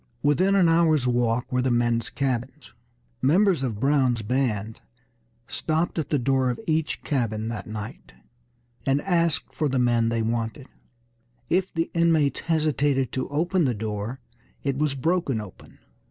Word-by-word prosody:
Within 180 +7 +3
an 185 -3 +5
hour's 165 -4 +3
walk 120 -1 0
were 125 0 +1
the 130 - +1
men's 120 0 +1
cabins. 135 -1 -3 0.5
Members 175 +3 +3
of 115 -6 -2
Brown's 130 -4 +2
band 110 -3 -1 0.7
stopped 160 +5 -1
at 150 -2 -3
the 150 - +2
door 130 0 +1
of 120 - -3
each 160 -1 -1
cabin 115 -6 -1
that 115 -2 -5
night, 110 +1 -7 0.7
and 135 +1 +2
asked 170 -4 +1
for 150 -2 0
the 135 - 0
men 120 -2 +2
they 115 -1 0
wanted. 115 +3 -2 0.9
If 185 +2 +1
the 165 0 -2
inmates 165 -4 +2
hesitated 145 -5 +1
to 130 - -3
open 170 +4 +1
the 125 -3 0
door 105 +3 -4 0.4
it 140 -2 0
was 150 -2 +1
broken 150 -3 0
open. 105 -4 -11
135 Hz, 150 wpm, -25 LUFS, 115-155 Hz, 0.9 s, an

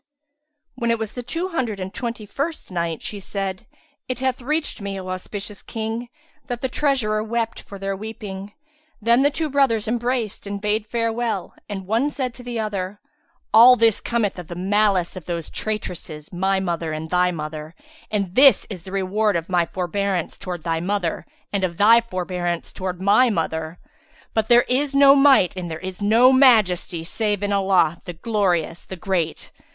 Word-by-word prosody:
When 235 -2 -2
it 230 - +2
was 220 -1 -4
the 245 - -5
Two 330 +10 -3
Hundred 245 - -2
and 190 +1 -5
Twenty 235 -3 -4
first 280 - -4
Night, 170 -3 -2
She 205 - -5
said, 195 -1 -4 0.4
It 255 - -1
hath 260 -1 -1
reached 300 -1 -2
me, 200 -1 -4
O 185 0 -7
auspicious 195 +2 -6
King, 225 +2 -4 0.4
that 245 -2 -4
the 260 - 0
treasurer 245 -7 +1
wept 230 +1 -2
for 200 - -10
their 195 0 -3
weeping; 205 -1 -7 0.5
then 235 +3 +4
the 285 - +4
two 310 +2 -2
brothers 265 -7 +2
embraced 240 -3 -2
and 200 0 -4
bade 210 +1 -1
farewell 230 -4 -2 0.2
and 195 -2 -5
one 230 +9 +1
said 260 -4 -3
to 245 - -12
the 240 -1 -4
other, 205 -2 -3 0.5
"All 240 +3 +9
this 225 -2 +3
cometh 220 -6 -1
of 175 - -8
the 175 - -7
malice 195 -1 +1
of 185 -4 -8
those 170 -2 -4
traitresses, 175 -8 -5
my 190 +2 +1
mother 170 -4 -2
and 155 +1 -5
thy 180 0 +3
mother; 155 -1 -6 0.3
and 200 -4 -1
this 270 +4 +6
is 185 -4 -6
the 185 - -10
reward 195 +2 +1
of 165 +1 -2
my 175 -2 +2
forbearance 190 0 -2
towards 175 -3 -5
thy 165 -1 0
mother 180 -1 -2 0.3
and 200 -1 0
of 170 -2 -1
thy 225 +4 +6
for 185 -6 -4
bearance 175 -2 -3
towards 185 -2 -4
my 210 +6 +4
mother! 160 -3 -2 0.6
But 220 -1 +1
there 240 +1 +6
is 275 +2 0
no 275 0 +8
Might 275 -10 +5
and 180 -2 -5
there 160 - -4
is 185 +2 -7
no 230 +5 +5
Majesty 210 -10 +4
save 205 +3 -2
in 205 0 0
Allah, 185 -4 +2
the 175 - -6
Glorious, 175 -3 0
the 190 - -8
Great! 175 -3 -2
205 Hz, 180 wpm, -22 LUFS, 180-235 Hz, 0.6 s, All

